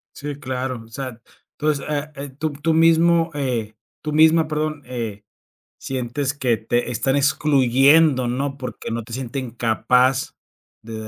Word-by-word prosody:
Sí, 145 -1 -6
claro. 130 -3 -4
O - - -17
sea, 125 0 -7 0.4
entonces, 150 -2 0
ah, 150 0 -3
en 140 -1 -8
tú 155 +1 -2
tú 150 +3 -1
mismo 165 +1 +4
eh, 120 -7 -2 0.3
tú 150 - -3
misma, 160 +1 +5
perdón, 155 -1 -2
eh, 115 -5 -5 0.6
sientes 130 +2 -3
que 125 -5 0
te 120 +2 -1
están 125 +3 0
excluyendo, 140 0 +4
¿no? 135 +3 -2
Porque 130 -3 -6
no 115 0 -3
te 115 - -11
sienten 130 0 -4
capaz 125 +3 +1 0.5
de 115 +1 -9
135 Hz, 145 wpm, -21 LUFS, 120-150 Hz, 0.6 s, misma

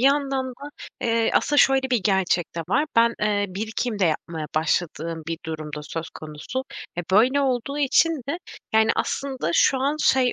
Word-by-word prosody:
yandan 275 0 +2
da, 280 +4 -10 0.3
eee 230 -1 +1
Aslında 290 -1 +3
şöyle 265 -1 +4
bir 235 -6 +2
gerçek 190 -4 +1
de - - -1
var. 290 +9 +2
Ben, 235 0 +5
eee, 205 -1 +1
birikim 220 +3 -3
de 195 - +3
yapmaya 160 -1 -2
başladığım 160 0 -1
bir 165 - -3
durum 155 -1 -5
da 150 - -6
söz 160 +2 -6
konusu. 155 - -6 0.3
E, 175 - 0
böyle 250 +8 +4
olduğu 270 +1 -1
için 290 +4 +4 0.2
de 330 - -1 0.3
yani 220 +1 +4
aslında 265 -9 -2
şu 265 - +4
an, 280 +3 0
şey, 260 -4 +3
230 Hz, 175 wpm, -24 LUFS, 170-265 Hz, 0.3 s, Ben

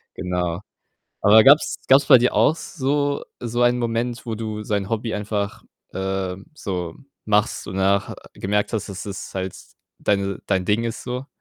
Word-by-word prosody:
genau. 90 0 -2 0.6
Aber 110 +2 +7
gab's 145 +5 +5
gab's 135 +1 +6
bei 135 -4 +8
dir 125 +1 +2
auch 155 - +4
so 145 -3 -1 0.2
so 120 0 -2
einen 120 0 +3
Moment, 120 0 -2
wo 115 - -2
du 110 -1 -4
so 105 - -4
ein 100 -1 -2
Hobby 115 0 -2
einfach, 105 -1 -3 0.3
ähm, 95 0 -3
so 90 - -4 0.3
machst 105 +1 +1
und 95 - -5
danach 100 +1 +2
ha - - -6 0.2
gemerkt 105 +3 -1
hast, 105 -2 -2
dass 100 -1 -6
es 100 -2 -7
halt 95 -1 -3 0.4
deine 100 -1 0
dein 95 -2 +1
Ding 105 +4 +1
ist 115 -1 -4
so? 125 +2 -4
105 Hz, 175 wpm, -22 LUFS, 95-120 Hz, 0.6 s, bei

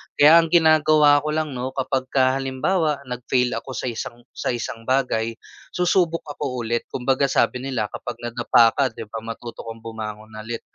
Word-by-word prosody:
Kaya 150 +3 +7
ang 165 - +1
ginagawa 155 -3 +5
ko - - -1
lang 155 -1 -1
noh 130 +1 -4
kapagka 130 0 +1
halimbawa 140 +3 0
nag-fail 125 0 0
ako 130 - -9
sa 130 - -2
isang 120 +1 -7
sa - - -2
isang 115 -1 -6
bagay 125 -4 0 0.4
susubok 175 -2 +2
ako 135 -4 -4
ulit 115 +1 -1
kumbaga 135 +2 +1
sabi 130 - +1
nila 125 -5 -3
kapag 120 - -6
nadapa 120 -1 +4
ka 140 - +3
'di 110 - -8
ba 115 - -4
matuto 115 0 -7
kang 115 0 -8
bumangon 110 -1 -7
ulit, 115 +1 -5
130 Hz, 170 wpm, -22 LUFS, 115-145 Hz, 0.4 s, Kaya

